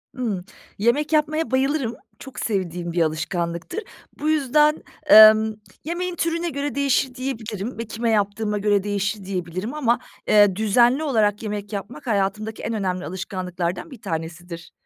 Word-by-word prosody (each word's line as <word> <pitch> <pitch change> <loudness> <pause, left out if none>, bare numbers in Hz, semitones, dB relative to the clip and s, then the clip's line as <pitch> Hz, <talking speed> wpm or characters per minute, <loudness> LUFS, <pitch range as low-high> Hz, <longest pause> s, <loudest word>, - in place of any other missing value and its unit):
Imm. 220 -8 -2 0.4
Yemek 265 +9 +1
yapmaya 310 0 +1
bayılırım. 265 -2 0 0.2
Çok 265 -2 -9
sevdiğim 180 -5 -2
bir 170 0 0
alışkanlıktır. 170 - -2 0.4
Bu 300 - 0
yüzden, 300 +1 +3 0.2
emm, 220 -3 +8 0.3
yemeğin 350 +3 -3
türüne 335 +1 -1
göre 285 -1 -3
değişir, 275 -2 +1
diyebilirim 230 -4 -5
ve 230 - -4
kime 230 +2 -2
yaptığıma 210 0 0
göre 205 -1 +2
değişir, 205 0 -2
diyebilirim 185 - -4
ama, 250 -6 +1 0.3
eee, 205 -3 +5
düzenli 240 +7 +3
olarak 215 -7 +1
yemek 210 -1 -5
yapmak 230 +8 -7
hayatımdaki 215 +1 -1
en 230 - -2
önemli 185 -4 -2
alışkanlıklardan 180 - -4
bir 250 -5 -11
tanesidir. 165 +1 -6
215 Hz, 135 wpm, -23 LUFS, 195-270 Hz, 0.4 s, emm